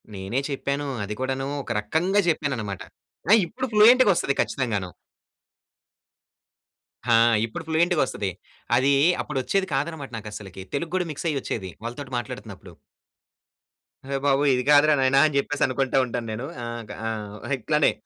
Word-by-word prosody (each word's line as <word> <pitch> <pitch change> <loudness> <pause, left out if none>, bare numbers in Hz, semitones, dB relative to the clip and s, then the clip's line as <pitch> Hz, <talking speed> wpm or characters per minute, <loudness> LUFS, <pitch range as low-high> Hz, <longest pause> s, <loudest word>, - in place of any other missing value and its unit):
నేనే 95 +7 -2
చెప్పాను. 140 +1 -2 0.2
అది 105 +1 -4
కూడాను 135 +1 -2 0.2
ఒక 120 - -6
రకంగా 160 - +1
చెప్పాను 145 -4 0
అన్నమాట. 100 -3 -5 0.5
ఆ! - - +9
ఇప్పుడు 170 - -4
ఫ్లూయెంటుగొస్తది 210 - +5
ఖచ్చితంగాను. 105 -9 -2 2.2
ఆ! - - +7 0.3
ఇప్పుడు 140 +9 -7
ఫ్లూయెంటుగొస్తది. 160 - +1 0.5
అదీ, 135 +3 +3 0.3
అప్పుడొచ్చేది 150 +7 -1
కాదన్నమాట. 145 0 -3
నాకు 110 -1 -7
అసలకి 95 -2 -8
తెలుగు 165 +3 -3
కూడా 180 -2 0
మిక్స్ 150 +3 -4
అయ్యొచ్చేది 115 -8 -3
వాళ్ళతోటి 130 +3 -6
మాట్లాడుతున్నప్పుడు. 120 -5 -8 1.3
అయ్య 135 0 -2
బాబోయ్! 140 0 +3
ఇది 125 0 0
కాదురా 150 +1 +6
నాయనా 135 +1 +4
అని 150 -2 0
చెప్పేసి 145 +1 0
అనుకుంట 130 0 -1
ఉంటాను 120 -1 -4
నేను. 115 +4 -4 0.2
ఆహ్, 115 -1 -5 0.2
ఆహ్, 105 +3 -5
ఇట్లానే 150 +5 +2
135 Hz, 130 wpm, -24 LUFS, 115-150 Hz, 2.2 s, ఆ